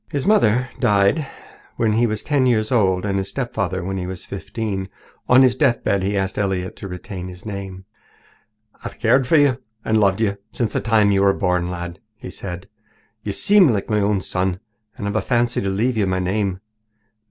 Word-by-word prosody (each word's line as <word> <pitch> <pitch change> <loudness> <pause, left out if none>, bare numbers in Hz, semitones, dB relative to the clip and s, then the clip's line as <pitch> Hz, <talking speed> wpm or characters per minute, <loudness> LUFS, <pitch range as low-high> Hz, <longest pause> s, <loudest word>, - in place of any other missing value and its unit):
His 140 -2 -2
mother 195 - +5
had 125 - -15
died 105 +9 +2 0.5
when 110 -2 +1
he 120 +2 +3
was 110 -1 -3
ten 140 -3 +2
years 110 -2 +1
old 95 -6 +2
and 100 -1 0
his 95 - -4
stepfather 100 -8 -3
when 95 +1 -3
he 90 -1 -4
was 90 -1 -7
fifteen. 100 0 -4 0.4
On 130 +1 +7
his 130 -1 +4
deathbed 115 -6 +1
he 100 +2 -1
asked 95 +1 -2
Elliott 95 -2 -2
to 100 - -7
retain 90 0 -7
his 90 -1 -11
name. 95 -2 -7 1.0
"I've - - -7
cared 125 +3 +3
for 160 - +3
you 140 -4 +3 0.2
and 110 0 +2
loved 100 -1 +2
you 100 -3 0
since 115 -4 -1
the - - +1
time 110 -3 +3
you 100 -1 +2
were 100 0 +4
born, 90 -2 0
lad," 90 0 -6 0.2
he 95 - -9
said. 90 -1 -7 0.5
"You 105 - -4
seem 200 - +5
like 105 -2 -1
my 105 - +2
own 100 -1 +1
son, 90 0 -1 0.4
and 105 -5 -4
I've 100 - -3
a 110 - +2
fancy 120 -1 0
to 100 - -1
leave 115 +5 0
you 100 -3 +1
my 95 0 0
name. 95 0 -1
100 Hz, 200 wpm, -21 LUFS, 95-115 Hz, 1.0 s, On